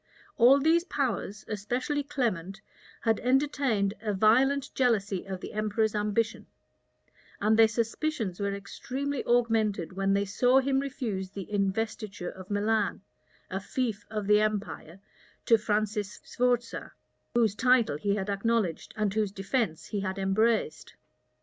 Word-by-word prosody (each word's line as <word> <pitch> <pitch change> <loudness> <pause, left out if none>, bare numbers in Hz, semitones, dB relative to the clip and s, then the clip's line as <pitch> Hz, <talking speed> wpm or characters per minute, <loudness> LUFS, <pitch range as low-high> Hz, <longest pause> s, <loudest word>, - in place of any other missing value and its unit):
All 255 +4 +6
these 325 +4 +3
powers, 230 - -2
especially 245 +8 -2
Clement, 215 - -2 0.4
had 225 -2 +1
entertained 255 -6 +1
a 210 -3 -1
violent 260 +7 +3
jealousy 210 -7 +1
of 190 -1 -6
the - - -7
emperor's 215 0 0
ambition; 210 +2 -1 0.9
and 215 +2 +3
their 225 0 +7
suspicions 225 - -2
were 200 0 -1
extremely 260 +8 -4
augmented 220 -7 +1
when 195 +1 +1
they 200 0 +1
saw 245 +6 +3
him 270 0 +1
refuse 230 -9 -3
the 200 +1 -8
investiture 205 -1 -2
of 185 0 -12
Milan, 210 0 0 0.5
a 190 - -1
fief 220 0 -3
of 210 -1 -3
the 210 +1 +5
empire, 205 -5 -3 0.5
to 230 -2 +5
Francis 210 -1 -1
Sforza, 245 -1 -1 0.4
whose 225 -4 +3
title 240 - +3
he 200 +6 0
had 195 -1 -3
acknowledged, 200 -3 -1
and 210 -2 0
whose 210 -2 0
defence 195 -3 -2
he 205 - -3
had 190 0 -3
embraced. 195 -5 0
215 Hz, 135 wpm, -28 LUFS, 200-245 Hz, 0.9 s, their